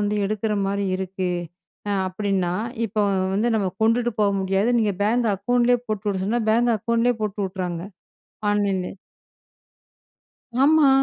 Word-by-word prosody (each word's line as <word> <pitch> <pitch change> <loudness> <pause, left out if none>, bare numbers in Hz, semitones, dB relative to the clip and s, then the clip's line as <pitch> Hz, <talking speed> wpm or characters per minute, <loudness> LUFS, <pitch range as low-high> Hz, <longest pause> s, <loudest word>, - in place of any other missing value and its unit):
வந்து 205 0 0
எடுக்கற 215 +1 -1
மாரி 200 +1 -1
இருக்கு, 185 -1 -3 0.6
அ - - +1 0.2
அப்படின்னா, 185 -2 -1 0.3
இப்போ 210 0 -1 0.3
வந்து 215 +4 +1
நம்ம 195 -3 0
கொண்டுட்டு 235 +2 +2
போக 205 -1 +4
முடியாது. 195 +3 +1
நீங்க 210 -3 +1
பேங்க் 230 +2 +2
அக்கவுண்ட்லயே 245 +4 +2
போட்டு 215 -1 -3
விட 190 - -2
சொன்னா, 235 +4 0
பேங்க் 235 +1 +3
அக்கவுண்ட்லயே 235 +3 +1
போட்டு 210 -1 -2
விட்டுர்றாங்க, 180 -3 -4 0.7
ஆன்லைன்லயே. 195 -3 0 1.7
ஆமா. 305 0 +5
210 Hz, 130 wpm, -23 LUFS, 195-230 Hz, 1.7 s, ஆமா